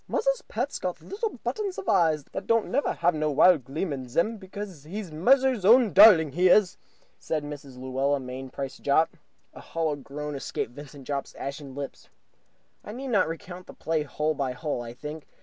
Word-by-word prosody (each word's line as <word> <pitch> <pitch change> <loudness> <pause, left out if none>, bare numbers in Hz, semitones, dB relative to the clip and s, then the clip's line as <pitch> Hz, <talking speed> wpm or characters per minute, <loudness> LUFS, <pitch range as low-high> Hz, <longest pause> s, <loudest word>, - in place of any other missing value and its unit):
"Muzzer's - - 0
pet - - -3
got - - -3
little 430 +2 -4
buttons 410 -4 -3
of - - -6
eyes, 155 -4 +3
that 190 - -6
don't 230 -1 +2
never 280 +4 +1
have 175 +1 +1
no 155 0 0
wild 150 +1 +5
gleam 150 +5 -3
in 130 -2 -6
zem 215 - 0
because 190 -5 -8
he's 185 +3 -6
muzzer's 255 - +3
own 230 +2 +6
darling, 185 -8 +8
he 180 +5 +3
was!" 195 -1 +5 0.4
said 155 -2 -2
Mrs. 145 -3 -9
Luella 135 +2 0
Mainprice 130 +1 -6
Jopp. 155 +5 +2 0.4
A - - -11
hollow 160 -2 -2
groan 145 +2 -6
escaped 135 -4 -4
Vincent 145 0 -11
Jopp's 140 -1 -4
ashen 140 -1 -6
lips. 140 -1 -7 0.7
I 210 - -8
need 265 +3 -6
not 210 -8 +3
recount 175 +2 -7
the - - -12
play 160 -1 -1
hole 150 +1 -1
by 135 -3 -2
hole, 145 -1 -3
I 120 0 -8
think. 150 +3 -8
155 Hz, 185 wpm, -27 LUFS, 140-200 Hz, 0.7 s, darling